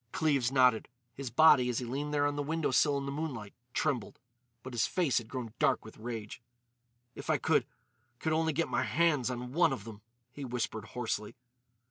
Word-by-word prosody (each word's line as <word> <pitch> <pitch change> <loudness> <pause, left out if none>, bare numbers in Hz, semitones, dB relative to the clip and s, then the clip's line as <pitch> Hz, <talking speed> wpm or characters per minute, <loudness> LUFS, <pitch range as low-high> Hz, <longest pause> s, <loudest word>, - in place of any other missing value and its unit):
Cleves 140 -6 +1
nodded. 125 -4 +4 0.3
His 130 0 -5
body, 130 -1 +6
as 120 - -1
he 125 - -2
leaned 140 +5 -3
there 145 -1 +2
on 145 0 0
the 145 - -1
window 155 0 -1
sill 140 +3 +3
in 140 - -3
the 140 - -3
moonlight, 140 -8 -4 0.2
trembled. 130 -5 -1 0.5
But 130 - -8
his 115 -4 +2
face 165 -10 +1
had 115 - -10
grown 120 -3 -5
dark - - +2
with 110 - -12
rage. 110 -2 -6 0.7
"If - - -9
I - - +4
could—could 155 +6 -2
only 160 0 +2
get 165 +3 0
my - - 0
hands 155 -7 +2
on 125 0 -5
one 170 0 +4
of 130 -7 -4
them," 110 -1 -10 0.3
he 145 - -8
whispered 120 -4 -3
hoarsely. 115 -1 -4
130 Hz, 190 wpm, -31 LUFS, 115-150 Hz, 0.7 s, body